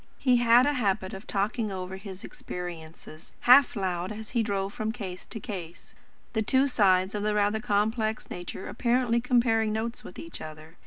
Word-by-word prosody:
He 255 -3 +3
had 240 +1 +6
a 290 - +2
habit 200 -5 0
of 195 +2 -9
talking 210 +2 -1
over 185 0 -5
his 190 -1 -9
experiences, 165 -2 -9
half 255 +2 +7
aloud, 185 -2 -2
as 215 0 -8
he 235 - +1
drove 200 -2 -2
from 215 0 -2
case 190 -6 -7
to 220 - -6
case; 180 -6 -8 0.4
the 220 - +1
two 260 +5 +3
sides 190 -6 +3
of 210 - -2
his 210 0 +1
rather 210 +1 +2
complex 220 0 0
nature 180 +1 -6
apparently 235 +1 +1
comparing 235 -3 +2
notes 225 +2 -3
with 180 - -11
each 165 - -8
other. 155 +1 -10
210 Hz, 175 wpm, -28 LUFS, 185-235 Hz, 0.4 s, half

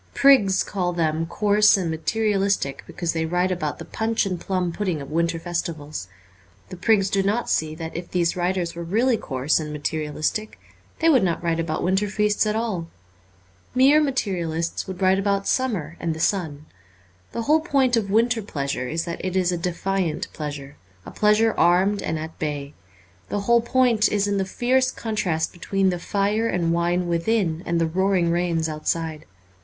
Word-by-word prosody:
Prigs 210 -9 +5
call 180 -3 -2
them 165 -1 0
coarse 210 +3 +4
and 175 -4 -2
materialistic 195 -3 0
because 170 -2 -3
they 160 -1 -1
write 180 +2 +1
about 155 -5 -2
the - - -8
punch 225 0 -1
and 185 -3 -3
plum 185 -2 -1
pudding 180 -3 -2
of 140 +1 -8
winter 170 +1 0
festivals. 165 - -4 0.6
The - - -7
prigs 195 +1 +2
do 195 0 +1
not 210 +5 0
see 155 0 0
that 160 0 -7
if 170 +1 -5
these 170 -2 0
writers 180 -1 -1
were 170 - -7
really 225 +9 +2
coarse 135 - 0
and 155 -1 -5
materialistic 155 +7 -3 0.4
they 325 - +4
would 265 -7 +5
not 175 -2 -1
write 165 -1 0
about 165 -1 -2
winter 190 +3 +1
feasts 210 +1 +1
at 210 - 0
all. 215 -7 -2 0.9
Mere 275 +4 +6
materialists 175 - -2
would 190 0 -5
write 190 +1 +4
about 200 0 0
summer 195 - -1
and 165 -2 -2
the - - -8
sun. 160 -5 -1 0.7
The 230 - -3
whole 305 +6 +4
point 275 -6 +2
of 215 -4 0
winter 230 +3 +2
pleasure 140 -9 -3
is 165 +5 -2
that 170 -1 -5
it 185 0 -2
is 180 -1 +2
a - - 0
defiant 180 -1 -2
pleasure, 145 -2 -6 0.3
a - - -8
pleasure 215 +1 +3
armed 190 +4 +3
and 160 - -2
at 160 +1 -7
bay. 145 -2 -3 0.6
The 205 - -1
whole 235 +3 +4
point 235 -3 +2
is 205 -1 +1
in 200 -1 0
the 190 - 0
fierce 255 +6 +1
contrast 185 -10 -2
between 190 +2 0
the 175 - -3
fire 205 +5 0
and 170 -5 0
wine 175 +1 0
within 170 -1 0
and 170 0 +1
the 165 - +2
roaring 180 0 +1
rains 170 -2 0
outside. 155 0 -3
180 Hz, 180 wpm, -23 LUFS, 165-210 Hz, 0.9 s, Mere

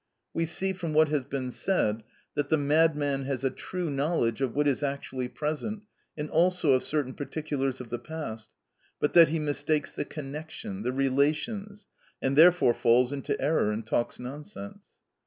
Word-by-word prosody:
We 165 0 0
see, 190 +3 -1
from 170 -4 -4
what 155 0 +5
has 145 -4 0
been 130 -2 -3
said, 115 - 0 0.3
that 145 -1 -1
the 160 - +4
madman 145 -2 +2
has 135 -2 -2
a 135 - +1
true 180 -2 -4
knowledge 140 -4 0
of 130 -3 -1
what 145 0 +2
is 140 0 +1
actually 135 -3 -3
present, 155 - -3 0.3
and 150 0 -3
also 170 -1 +3
of 130 -1 +3
certain 145 -4 -1
particulars 140 -2 -3
of 125 -2 -8
the 120 - -2
past, 120 -6 -6 0.5
but 150 - +1
that 170 -2 +9
he 160 +2 -1
mistakes 150 0 -1
the - - -3
connection, 145 -9 -7
the 125 +3 -1
relations, 150 - 0 0.3
and 135 +1 0
therefore 165 -5 +6
falls 120 +3 +3
into 140 -2 -2
error 140 -6 +2
and 110 +1 -4
talks 120 +1 -1
nonsense. 200 +10 -8
145 Hz, 170 wpm, -28 LUFS, 130-160 Hz, 0.5 s, that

